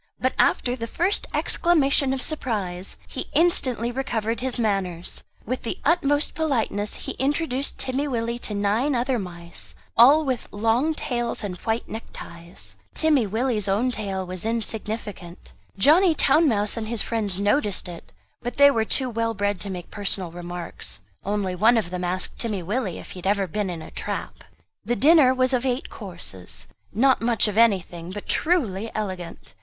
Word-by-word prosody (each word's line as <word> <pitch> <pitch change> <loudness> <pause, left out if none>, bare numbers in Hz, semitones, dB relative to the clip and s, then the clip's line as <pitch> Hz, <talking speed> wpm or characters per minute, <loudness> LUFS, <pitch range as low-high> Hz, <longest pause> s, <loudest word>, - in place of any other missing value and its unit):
But 255 - +1
after 245 0 +3
the 230 -2 -5
first 355 - +1
exclamation 280 -5 +3
of 265 -1 -2
surprise 200 - -2
he - - -5
instantly 255 -8 +3
recovered 235 -3 -2
his 260 0 -2
manners. 195 -6 -2 0.2
With 255 +4 -2
the 230 - -4
utmost 290 -2 +2
politeness 230 -9 -1
he - - -5
introduced 280 0 0
Timmy 265 +2 -1
Willie 235 -2 -2
to 210 - -2
nine 215 +8 +1
other 245 0 +1
mice, 175 -2 -5 0.2
all 285 +7 +7
with 260 -3 -2
long 230 +9 +1
tails 240 -5 -2
and 195 -3 -3
white 225 +3 -2
neckties. 170 -5 -8 0.2
Timmy 295 -8 +3
Willie's 220 0 -1
own 215 +6 +2
tail 195 -5 -3
was 185 0 -5
insignificant. 215 -5 -4 0.2
Johnny 320 - +5
Town 305 +3 +4
mouse 210 -3 +1
and 220 -1 -3
his 230 -2 -1
friends 210 -5 -1
noticed 205 -1 +1
it; 175 -1 -10 0.3
but 245 0 -5
they 285 0 +8
were 225 -4 +1
too 260 +3 0
well 230 -1 -1
bred 205 -1 0
to 205 - -2
make 180 -2 -6
personal 195 -4 0
remarks; 175 - -7 0.2
only 200 -2 -1
one 220 +6 +4
of 195 -6 -1
them 180 0 -3
asked 180 +1 -2
Timmy 210 -6 -2
Willie 200 0 -2
if - - -10
he 185 - -8
had 180 - -4
ever 200 -1 +2
been 195 +3 -2
in 165 -3 -5
a - - -11
trap? - - -5 0.4
The 240 +4 0
dinner 295 -1 +6
was 260 0 +2
of 250 -1 +1
eight 255 0 -2
courses; 170 - -7 0.3
not 260 +4 +3
much 230 -2 +3
of 210 - -3
anything, 185 -6 +2
but 205 +2 -7
truly 230 - +1
elegant. 185 -5 -5
225 Hz, 170 wpm, -24 LUFS, 195-260 Hz, 0.4 s, they